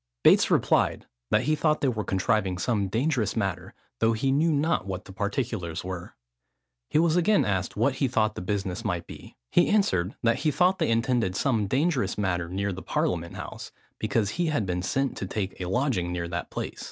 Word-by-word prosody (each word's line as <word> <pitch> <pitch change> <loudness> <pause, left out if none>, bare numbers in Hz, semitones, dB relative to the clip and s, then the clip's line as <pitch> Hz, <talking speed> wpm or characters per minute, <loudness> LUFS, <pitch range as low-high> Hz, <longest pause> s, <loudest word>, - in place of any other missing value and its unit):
Bates - - +6
replied, - - +2 0.2
that - - +3
he 155 - +2
thought 155 0 +1
they 140 - +2
were 110 -4 -1
contriving 95 0 0
some 100 0 0
dangerous 115 0 0
matter, 95 -3 -3 0.2
though 115 0 +3
he 135 +5 0
knew 155 +4 +3
not 150 - +1
what 95 -1 -5
the 95 - -11
particulars 100 -4 -3
were. 90 -1 -6 0.7
He - - +1
was 165 0 +3
again 190 +4 +3
asked 95 -1 -1
what 130 +5 +2
he 135 - +2
thought 110 -3 +1
the - - -6
business 95 -1 -2
might - - -2
be. - - -12 0.2
He 175 - +4
answered, 100 - +1
that 115 0 +2
he 155 - +1
thought 180 +5 +2
they 160 - +1
intended 115 -4 +1
some 110 -4 +1
dangerous 140 - +1
matter 90 -4 -1
near 100 +2 -2
the 95 - -7
Parliament 85 -1 -1
House, - - -7 0.3
because 105 -2 0
he 175 +6 -1
had 145 -9 0
been 90 -1 -2
sent 135 +8 -1
to 95 - -4
take 95 -1 -4
a 90 - -3
lodging 120 -7 0
near 85 -1 -3
that 85 -1 -4
place. - - -5
110 Hz, 200 wpm, -27 LUFS, 95-135 Hz, 0.7 s, Bates